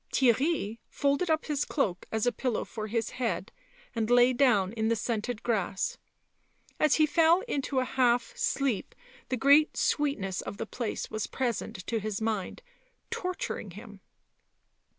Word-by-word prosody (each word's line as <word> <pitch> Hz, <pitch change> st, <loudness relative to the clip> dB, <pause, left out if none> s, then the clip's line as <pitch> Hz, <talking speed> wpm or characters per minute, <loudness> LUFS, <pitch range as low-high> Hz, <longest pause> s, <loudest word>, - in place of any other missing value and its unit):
Theirry 255 Hz, -3 st, +2 dB
folded 285 Hz, +5 st, 0 dB
up 315 Hz, 0 st, +1 dB
his 295 Hz, -2 st, 0 dB
cloak 195 Hz, -, -1 dB
as 220 Hz, 0 st, 0 dB
a 245 Hz, -, +3 dB
pillow 240 Hz, 0 st, -2 dB
for 215 Hz, -1 st, -6 dB
his 230 Hz, +1 st, -1 dB
head 250 Hz, -2 st, -2 dB, 0.4 s
and 225 Hz, -1 st, -1 dB
lay 245 Hz, +1 st, +6 dB
down 225 Hz, -7 st, +3 dB
in 220 Hz, -1 st, -1 dB
the 230 Hz, -, +2 dB
scented 225 Hz, 0 st, -3 dB
grass; 200 Hz, -5 st, -1 dB, 0.8 s
as 305 Hz, -, +4 dB
he 310 Hz, -, +5 dB
fell 330 Hz, +3 st, +4 dB
into 285 Hz, -, -2 dB
a 255 Hz, -, 0 dB
half 250 Hz, -, +1 dB
sleep 275 Hz, -, -1 dB, 0.3 s
the 255 Hz, -, 0 dB
great 285 Hz, +5 st, +5 dB
sweetness 215 Hz, -11 st, 0 dB
of 200 Hz, -, -7 dB
the 225 Hz, -, -3 dB
place 230 Hz, 0 st, -4 dB
was 215 Hz, -1 st, -2 dB
present 235 Hz, -7 st, -3 dB
to 230 Hz, -, -1 dB
his 210 Hz, -1 st, -3 dB
mind, 220 Hz, -, -2 dB, 0.5 s
torturing 365 Hz, -, -3 dB
him. 205 Hz, +1 st, -11 dB
245 Hz, 150 wpm, -29 LUFS, 215-280 Hz, 0.8 s, lay